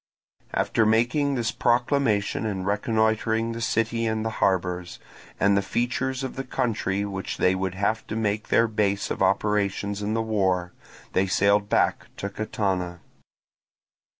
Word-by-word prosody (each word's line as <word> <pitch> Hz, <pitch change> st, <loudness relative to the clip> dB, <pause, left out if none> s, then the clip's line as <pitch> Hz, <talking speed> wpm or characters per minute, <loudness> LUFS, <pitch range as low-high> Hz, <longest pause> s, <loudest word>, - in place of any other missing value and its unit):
After 110 Hz, -, +2 dB
making 120 Hz, +6 st, +2 dB
this 115 Hz, -3 st, 0 dB
proclamation 120 Hz, -4 st, +1 dB
and 100 Hz, -4 st, -2 dB
reconnoitring 110 Hz, +2 st, +1 dB
the 115 Hz, 0 st, -5 dB
city 115 Hz, 0 st, 0 dB
and 110 Hz, 0 st, -1 dB
the 110 Hz, -, -1 dB
harbours, 90 Hz, -2 st, 0 dB, 0.4 s
and 100 Hz, 0 st, +4 dB
the 100 Hz, -, +3 dB
features 125 Hz, +5 st, -1 dB
of 130 Hz, -, -4 dB
the 135 Hz, -, -3 dB
country 110 Hz, -6 st, -1 dB
which 95 Hz, -1 st, -4 dB
they 90 Hz, -, +3 dB
would 95 Hz, -1 st, -2 dB
have 105 Hz, +3 st, -1 dB
to 110 Hz, -, -4 dB
make 105 Hz, -1 st, -1 dB
their 115 Hz, -, +4 dB
base 105 Hz, -2 st, 0 dB
of -, -, -3 dB
operations 100 Hz, +1 st, +1 dB
in 105 Hz, +2 st, -1 dB
the 115 Hz, -, +1 dB
war, 95 Hz, -5 st, 0 dB, 0.4 s
they 95 Hz, +1 st, +2 dB
sailed 100 Hz, +2 st, +2 dB
back -, -, +1 dB
to 100 Hz, -, -3 dB
Catana. 95 Hz, -4 st, -2 dB
105 Hz, 150 wpm, -25 LUFS, 100-115 Hz, 0.4 s, and